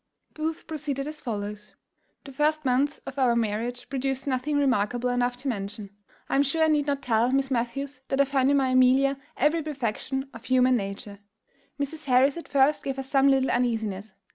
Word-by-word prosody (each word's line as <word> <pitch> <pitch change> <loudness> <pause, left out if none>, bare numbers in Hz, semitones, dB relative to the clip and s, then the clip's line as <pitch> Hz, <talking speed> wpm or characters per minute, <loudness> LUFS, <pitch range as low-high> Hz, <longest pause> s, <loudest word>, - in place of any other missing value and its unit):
_ - - -36
Booth 315 +1 -4
proceeded 285 -3 -4
as 305 0 -7
follows: 210 -2 -5 0.5
"The 275 - -10
first 300 +2 0
months 270 +4 +1
of 275 - -6
our 245 -3 +3
marriage 235 +2 -2
produced 270 0 -2
nothing 280 +2 -1
remarkable 250 -3 +1
enough 245 0 0
to 265 +3 -6
mention. 200 -3 -4 0.4
I - - -4
am 275 - +5
sure 305 +3 +2
I 315 - +4
need 295 -2 +2
not 280 -1 -1
tell 235 +1 +2
Miss 270 0 +1
Matthews 255 +2 -2
that 270 - -1
I 280 - +6
found 270 -1 +2
in 285 - +4
my 265 -1 +2
Amelia 260 +2 +4 0.2
every 305 +5 +2
perfection 265 -2 -3
of 230 +1 -11
human 255 0 +4
nature. 200 -1 -5 0.6
Mrs. 300 +3 -4
Harris 265 +1 +4
at 335 - -8
first 280 +2 +2
gave 270 -1 -3
us 270 0 -5
some 275 -1 +4
little 270 -1 +3
uneasiness. 220 -5 -1
265 Hz, 190 wpm, -26 LUFS, 240-280 Hz, 0.6 s, I